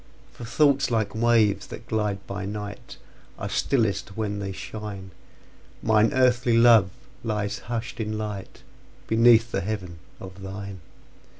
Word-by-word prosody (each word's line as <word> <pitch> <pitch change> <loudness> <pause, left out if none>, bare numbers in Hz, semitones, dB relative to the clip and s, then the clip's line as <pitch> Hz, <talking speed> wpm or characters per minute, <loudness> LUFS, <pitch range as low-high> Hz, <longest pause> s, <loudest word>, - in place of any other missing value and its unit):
For 120 - -9
thoughts, 140 +3 +3
like 110 -4 0
waves 110 -2 +2
that 115 - -9
glide 105 -3 -1
by 100 0 -5
night, 105 0 -7 0.4
Are - - -4
stillest 105 -6 0
when 105 -2 -2
they 100 -1 -4
shine; 100 -1 -7 0.7
Mine 110 0 +4
earthly 125 -2 +3
love 115 -5 +6 0.3
lies 105 -2 -2
hush'd 120 0 -4
in 110 -1 -2
lightBeneath 110 +3 0
the 95 - -1
heaven 90 -4 -5 0.2
of 95 0 -10
thine. 95 0 -7
105 Hz, 125 wpm, -25 LUFS, 100-115 Hz, 0.7 s, love